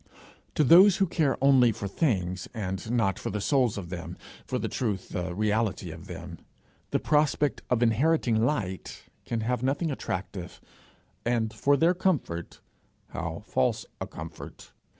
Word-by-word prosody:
To 150 - +4
those 180 +7 +8
who 195 - +3
care 160 -5 +1
only 130 -4 +6
for 100 -1 -5
things, 95 - -1
and 95 -1 -4
not 115 -5 +1
for - - -4
the 105 - -2
souls 125 -1 +2
of 90 -4 -6
them, 85 -1 -6 0.3
for - - -1
the - - -2
truth, 105 -7 -2
the 90 -1 -3
reality 110 +1 0
of - - -10
them, - - -8 0.5
the - - +1
prospect 150 -1 +1
of 125 -1 +2
inheriting 120 -1 +2
light 100 -9 -2 0.2
can 115 -1 -2
have 120 +1 -1
nothing 145 +5 0
attractive, 95 -7 -5 0.6
and 115 -2 0
for 140 +6 +3
their 165 +5 +4
comfort 160 - -2 0.5
how - - -5
false 65 - 0
a - - -4
comfort! - - -10
115 Hz, 150 wpm, -28 LUFS, 95-140 Hz, 0.6 s, those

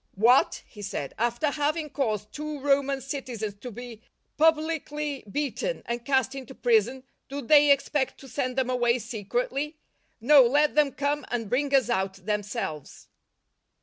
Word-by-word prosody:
" - - -39
What," 235 +6 +4
he 210 - -13
said, 190 -8 -4
" - - -19
after 240 +6 0
having 305 +2 -1
I;: - - -11
caused 215 -7 -2
two 300 0 -5
Roman 275 0 +1
citizens 250 -6 -5
to 250 - -6
be 240 -1 -9 0.3
publicly 305 -2 +1
I'i; - - -15
beaten 295 - -2
and 235 0 -3
cast 265 -1 +1
into 265 -1 -8
prison, 240 +2 +2 0.3
do 280 +1 -4
they 290 +2 +5
expect 280 -1 +1
to - - -12
p 270 - -13
' - - -14
send 255 -3 -2
them 255 -1 +1
away 240 -1 +2
secretly? 245 +7 -3 0.4
No, 275 +5 +7
let 290 +5 +3
them 295 -2 +3
come 285 +2 -1
and 230 -4 -3
bring 280 +2 +1
us 260 -3 +3
out 190 -3 0
themselves." 205 - -4
265 Hz, 175 wpm, -26 LUFS, 235-290 Hz, 0.4 s, No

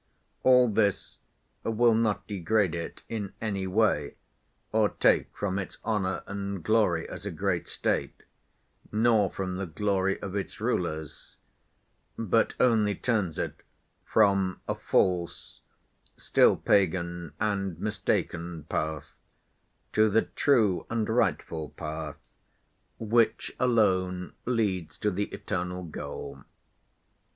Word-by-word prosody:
All 125 -1 +6
this 105 -2 0 0.4
will 115 +1 +3
not 110 -2 +1
degrade 100 -1 +1
it 85 -1 -5
in 105 -4 -4
any 100 -4 -2
way 110 +3 +1 0.6
or 110 -1 +3
take - - +3
from 100 -1 -1
its 95 - -6
honor 105 -4 -1
and 100 -2 -4
glory 105 -6 +2
as 90 - -8
a - - -1
great 90 0 -1
State, - - -2 0.7
nor 110 -2 +3
from 95 -1 -4
the 95 -1 -3
glory 95 +2 0
of 100 -1 -6
its 100 - -4
rulers, 80 -1 -3 0.8
but 115 0 +1
only 110 -5 +3
turns 105 -10 0
it - - -4 0.4
from 100 -3 +2
a - - +1
false, 90 -2 0 0.6
still - - +4
pagan, 85 -4 +1
and 100 -5 -1
mistaken 85 -5 -2
path 80 0 -3 0.8
to 110 0 +4
the 110 +2 +3
true 110 -10 +2
and 115 -2 -1
rightful 85 -8 0
path, 75 -1 -5 0.8
which 115 0 +1
alone 95 -7 +2
leads 100 -9 -1
to 105 - 0
the 100 +2 -1
eternal 90 -1 -4
goal. 80 -3 -7
100 Hz, 115 wpm, -28 LUFS, 90-110 Hz, 0.8 s, All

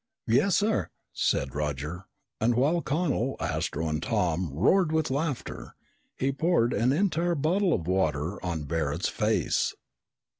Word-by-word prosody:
"Yes, 165 - +3
sir!" 215 +1 +1 0.2
said 65 -2 0
Roger, 75 +5 -3 0.3
and 115 +2 +2
while 150 +8 +2
Connel, 145 -6 0
Astro, 80 +2 -2
and 75 0 -1
Tom 90 -6 0
roared 155 - +3
with 160 -3 0
laughter, 145 -1 -3 0.4
he 135 +1 +1
poured 135 -4 +2
an 115 +5 +2
entire 175 +1 +1
bottle 175 +6 +1
of 85 - 0
water 90 -1 -1
on 85 -4 -2
Barret's 75 +2 -1
face. - - 0
120 Hz, 135 wpm, -27 LUFS, -, 0.4 s, Yes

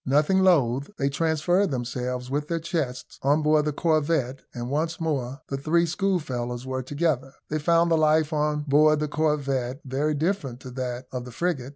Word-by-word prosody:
Nothing 150 +8 +3
loath, 140 -8 +3
they 140 - +1
transferred 165 +6 +1
themselves, 125 -1 -3
with 145 +1 -1
their 170 - -1
chests, 155 -7 -4
on 145 +3 +2
board 150 0 +3
the 150 - +1
corvette, 150 -4 +1
and 120 0 -5
once 160 +3 -1
more 140 -4 -2
the 135 - -2
three 165 +5 +2
schoolfellows 150 - -2
were 130 0 -2
together. 135 -1 -1 0.2
They 155 - 0
found 170 +2 +3
the 165 - +4
life 155 0 +3
on 150 0 +1
board 150 +1 +4
the 150 - -1
corvette 140 -4 -1
very 145 +4 0
different 145 -6 -1
to 130 - -9
that 125 0 -4
of 125 -1 -4
the 125 - -9
frigate. 140 -2 -2
150 Hz, 180 wpm, -25 LUFS, 130-160 Hz, 0.2 s, the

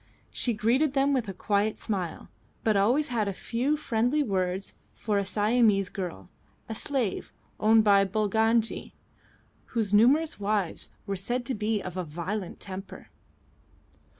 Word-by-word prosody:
She 240 -3 0
greeted 255 +7 +2
them 275 0 +2
with 250 -5 0
a - - -3
quiet 205 +2 0
smile, 185 -6 -4 0.3
but 220 -2 +2
always 245 +10 +3
had 225 -4 0
a 200 - -1
few 250 +9 -1
friendly 245 +2 +1
words 190 -3 -1 0.2
for 210 -2 0
a 200 - -1
Siamese 210 -2 +2
girl, 175 - -6 0.4
a 225 - -4
slave 245 -3 -2 0.3
owned 220 +1 +5
by 200 -2 +5
Bulangi, 220 +3 0 0.8
whose 210 -3 0
numerous 270 +9 +4
wives 200 -4 -1 0.2
were 200 -1 -2
said 240 +6 -1
to 260 - 0
be 215 -1 -1
of 185 0 -6
a 185 - -1
violent 175 +5 -5
temper. 195 0 -8
215 Hz, 145 wpm, -27 LUFS, 195-240 Hz, 0.8 s, owned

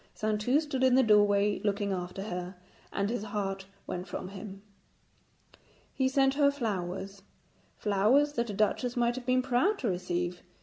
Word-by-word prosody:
Saintou 215 +6 +1
stood 290 -4 -2
in 260 -1 +5
the 260 - +5
doorway 205 -2 +4
looking 205 -1 0
after 180 +1 -4
her, 180 -2 -5 0.4
and 200 0 -1
his 245 - -2
heart 195 -2 -3 0.2
went 180 +1 -5
from 185 - -5
him. 195 0 -9 1.3
He 265 -1 +1
sent 270 0 +3
her 285 0 +4
flowers 195 -6 -4 0.6
flowers 225 +9 +3
that 235 -3 -1
a - - -3
duchess 240 +4 0
might 240 0 +2
have 250 0 -7
been 255 0 +3
proud 265 - +2
to 245 - -1
receive. 175 -1 -2
210 Hz, 160 wpm, -30 LUFS, 195-255 Hz, 1.3 s, in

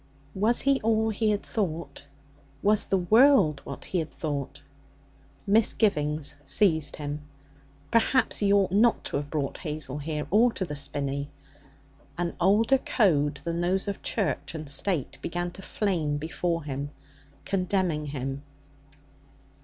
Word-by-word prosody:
Was 215 +5 +2
he 275 -1 +2
all 220 0 +2
he 215 +1 0
had 205 -1 0
thought? 170 -8 -4 0.6
Was 210 +1 +3
the 195 - +1
world 210 - +5
what 140 - -8
he 185 - -1
had 160 -2 -3
thought? 145 -2 -5 0.8
Misgivings 160 -9 +2
seized 160 +1 +2
him. 145 0 -5 0.7
Perhaps 230 +3 +3
he 200 -1 +2
ought 200 -3 +3
not 225 +5 +3
to - - -2
have 145 0 -5
brought 145 -3 -3
Hazel 150 -4 -4
here 150 0 -3
or 230 +5 +5
to 185 - -2
the 150 -3 -6
Spinney. 140 0 -2 0.9
An 175 -1 -1
older 220 +8 +4
code 150 - +1
than 170 0 -2
those 190 +3 0
of 200 - -4
Church 200 -5 -2
and 155 -1 -6
State 145 +1 -1
began 175 +1 -3
to 195 - -10
flame 170 -8 -1
before 165 +2 -2
him, 140 0 -4 0.6
condemning 180 -5 0
him. 135 -1 -4
170 Hz, 140 wpm, -27 LUFS, 150-205 Hz, 0.9 s, world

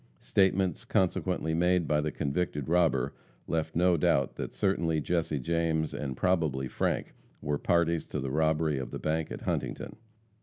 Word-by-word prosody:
Statements 95 +2 +1
subsequently 90 -3 +1
made 90 0 +2
by 75 -1 +2
the 75 0 -2
convicted 75 -1 -2
robber 80 -6 +2 0.3
left 80 -1 -2
no 90 +1 +4
doubt 70 -3 +2
that - - -4
certainly 85 -5 +1
Jesse 80 -1 0
James, 80 +2 0
and 65 -4 -4
probably 80 -8 +1
Frank, - - -1 0.3
were 75 0 -2
parties 85 -1 +1
to - - -3
the 65 0 -3
robbery 80 -1 +1
of 65 - -5
the - - -5
bank 80 0 -1
at - - -6
Huntington. - - -3
80 Hz, 155 wpm, -29 LUFS, 75-85 Hz, 0.3 s, no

